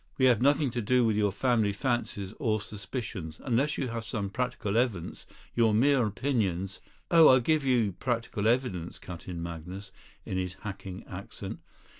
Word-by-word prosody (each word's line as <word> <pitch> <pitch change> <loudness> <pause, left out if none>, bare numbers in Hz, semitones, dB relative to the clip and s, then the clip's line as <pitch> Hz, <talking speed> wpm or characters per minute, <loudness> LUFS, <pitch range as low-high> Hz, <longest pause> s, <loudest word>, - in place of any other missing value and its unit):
"We 130 - +4
have 120 -4 +5
nothing 140 0 +3
to 120 - -2
do 125 +3 +3
with 110 -2 +2
your 105 -1 +2
family 110 -1 +2
fancies 105 -4 -2
or 110 -5 +1
suspicions. 100 - -6
Unless 135 +4 +1
you 130 - -1
have 115 0 -4
some 100 -3 -3
practical 120 -3 -2
evidence, 110 -8 -1 0.3
your 115 -3 +4
mere 130 0 +4
opinions 100 -5 -1 0.2
" - - -35
"Oh! 165 -2 +8
I'll 130 - +7
give 155 +4 +2
you 120 -6 +2
practical 115 0 -2
evidence," 115 -9 0
cut 90 -2 -9
in 85 -2 -4
Magnus, 90 +4 -7 0.3
in 95 - -3
his 90 -1 -3
hacking 95 -3 -7
accent. - - -7
110 Hz, 170 wpm, -29 LUFS, 95-125 Hz, 0.3 s, Oh